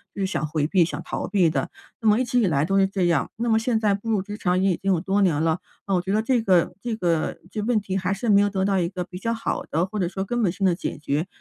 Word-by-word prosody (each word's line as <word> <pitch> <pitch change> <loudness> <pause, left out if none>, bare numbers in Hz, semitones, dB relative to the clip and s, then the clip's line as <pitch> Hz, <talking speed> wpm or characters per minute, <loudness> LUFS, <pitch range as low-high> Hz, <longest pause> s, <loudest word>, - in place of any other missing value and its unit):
就 200 - -4
是 - - +2
想 170 -5 -2
回 150 -1 -1
避、 175 +1 +3
想 - - -5
逃 - - -4
避 185 -4 +3
的， - - -2 0.3
那 225 - -1
么 215 +3 +5
一 - - +2
直 245 0 +1
以 210 - +3
来 145 -3 +2
都 195 +4 +2
是 190 - +4
这 190 -2 0
样。 160 -6 +1
那 235 +1 -2
么 220 0 +4
现 230 0 0
在 205 -2 +3
步 205 +3 -4
入 210 -4 +2
职 205 +2 -7
场 180 -1 +1
也 195 - +3
已 - - -14
经 195 -1 +2
有 165 - 0
多 195 +2 +1
年 160 -5 +2
了， 165 +2 +1 0.3
那 - - +2
我 180 - +2
觉 190 +2 -2
得， 215 - +2
这 240 0 +1
个 185 -5 +2
这 235 -2 -2
个 170 -6 0
这 215 - -4
个 215 - -3
问 225 -4 +2
题 190 -1 -3
还 190 +1 -1
是 215 +3 -3
没 200 -1 +6
有 205 0 +3
得 190 -1 -1
到 195 -1 +2
一 170 - +1
个 180 -1 -4
比 180 +1 -9
较 230 +3 -1
好 230 - -3
的， 165 +4 +1
或 210 +2 -5
者 175 - +1
说 190 +1 -3
根 240 +4 -2
本 195 - +3
性 195 +2 -2
的 180 - +4
解 170 - -4
决， 150 +3 -2
195 Hz, 350 characters per minute, -24 LUFS, 175-215 Hz, 0.3 s, 没